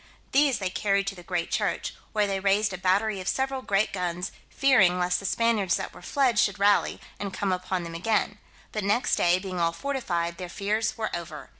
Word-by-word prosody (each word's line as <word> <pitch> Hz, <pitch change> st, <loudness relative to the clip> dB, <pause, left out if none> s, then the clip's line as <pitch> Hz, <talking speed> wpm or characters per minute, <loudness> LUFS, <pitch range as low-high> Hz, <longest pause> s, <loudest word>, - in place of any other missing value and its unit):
These 275 Hz, -2 st, +4 dB
they 190 Hz, -2 st, -2 dB
carried 200 Hz, 0 st, +1 dB
to 195 Hz, -, -3 dB
the 175 Hz, -, -11 dB
great 175 Hz, -1 st, -3 dB
church, -, -, -1 dB, 0.2 s
where 210 Hz, -1 st, +2 dB
they 195 Hz, -1 st, -1 dB
raised 200 Hz, +1 st, +2 dB
a -, -, -4 dB
battery 195 Hz, +2 st, +1 dB
of 185 Hz, -, -8 dB
several 265 Hz, 0 st, -1 dB
great 205 Hz, -3 st, +1 dB
guns, 180 Hz, 0 st, -2 dB, 0.2 s
fearing 215 Hz, -10 st, +4 dB
lest 180 Hz, 0 st, +1 dB
the 195 Hz, -, -4 dB
Spaniards 225 Hz, -5 st, +2 dB
that -, -, -5 dB
were -, -, -13 dB
fled 260 Hz, -6 st, +2 dB
should 200 Hz, -1 st, +2 dB
rally, 205 Hz, 0 st, +3 dB, 0.2 s
and 200 Hz, -1 st, -3 dB
come 195 Hz, 0 st, -1 dB
upon 185 Hz, 0 st, -2 dB
them 170 Hz, 0 st, -7 dB
again; 210 Hz, +3 st, 0 dB, 0.3 s
but 215 Hz, -, -3 dB
next 210 Hz, +5 st, +2 dB
day, 175 Hz, +1 st, +3 dB
being 185 Hz, -1 st, -5 dB
all 170 Hz, 0 st, +2 dB
fortified, 175 Hz, -9 st, -2 dB
their 180 Hz, -1 st, -5 dB
fears 210 Hz, +4 st, -1 dB
were 220 Hz, -1 st, -2 dB
over. 160 Hz, -4 st, -7 dB
195 Hz, 205 wpm, -27 LUFS, 180-215 Hz, 0.3 s, These